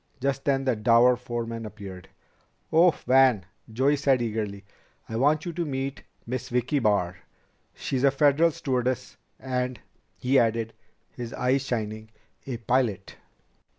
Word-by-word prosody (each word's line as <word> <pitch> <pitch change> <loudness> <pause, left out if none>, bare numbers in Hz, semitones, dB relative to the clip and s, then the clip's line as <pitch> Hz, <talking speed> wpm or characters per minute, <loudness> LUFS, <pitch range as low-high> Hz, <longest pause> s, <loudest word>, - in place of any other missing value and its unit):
Just 135 +1 -1
then 135 -1 +1
the 130 -3 +2
dour 115 +3 +5
foreman 115 -1 -5
reappeared. 100 -5 -9 0.6
"Oh, 170 +3 +7 0.2
Van," 125 -6 +4 0.3
Joey 135 +6 +2
said 135 -2 +2
eagerly, 105 -4 -3 0.4
"I 110 - -6
want 145 +6 +2
you 175 - -4
to 170 +1 -2
meet 135 -2 -3 0.2
Miss 125 +1 -4
Vicki 125 +4 0
Barr. 100 -6 +1 0.6
She's 130 -1 -2
a 140 - +7
Federal 145 +4 +4
stewardess 130 -3 -2 0.2
and 125 -1 -2 0.2
" - - -42
he 135 +2 +3
added, 115 0 0 0.4
his 120 -1 -7
eyes 130 +2 +1
shining, 110 -3 -4 0.4
"a 125 -3 -3
pilot." 115 -4 -1
125 Hz, 140 wpm, -26 LUFS, 115-135 Hz, 0.6 s, Oh